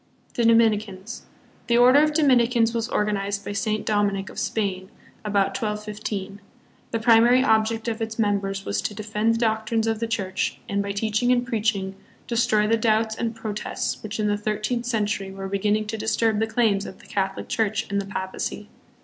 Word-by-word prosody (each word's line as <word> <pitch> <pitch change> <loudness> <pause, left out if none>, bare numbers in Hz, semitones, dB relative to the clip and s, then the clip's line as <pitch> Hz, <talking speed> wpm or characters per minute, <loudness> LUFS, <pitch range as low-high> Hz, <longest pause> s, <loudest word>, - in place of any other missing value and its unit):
The 235 - 0
Dominicans. 220 -2 +1 0.4
The 235 - +3
Order 255 +4 +7
of 305 0 +3
Dominicans 240 -6 +3
was 230 0 -2
or 210 - +1
ganized 200 -1 -2
by - - -4
Saint 215 +1 -1
Dominic, 200 -2 0
of - - -7
Spain, 190 -3 -2 0.3
about 200 -2 +1
1215. 210 -3 -4 0.5
The 230 - -1
primary 235 +3 +5
object 220 -1 +2
of 225 0 -2
its 220 0 -3
members 200 -2 0
was - - -1
to 210 - -4
defend 215 +1 0
the - - -1
doc 220 -2 0
trines 225 -1 +1
of 225 -1 0
the 230 - -1
Church 195 -4 -2
and, 200 -2 0
by 200 0 -3
teaching 215 +4 0
and 245 -1 +2
preaching, 215 -5 -1 0.3
destroy 220 -3 +2
the 225 +2 +2
doubts 220 0 +2
and 230 0 -3
protests 215 -2 -4
which 215 +1 -6
in 215 - +1
the 205 0 +1
thirteenth 215 +3 -2
century 210 -4 -1
were 195 0 -6
beginning 205 +2 0
to 220 +1 -5
disturb 220 0 +1
the 220 - +1
claims 220 -3 +1
of 185 - -9
the - - -18
Cath 195 -1 -1
olic - - -7
Church 220 -1 0
and 200 0 +1
the 195 - -8
Papacy. 195 +1 -4
215 Hz, 190 wpm, -24 LUFS, 200-230 Hz, 0.5 s, Order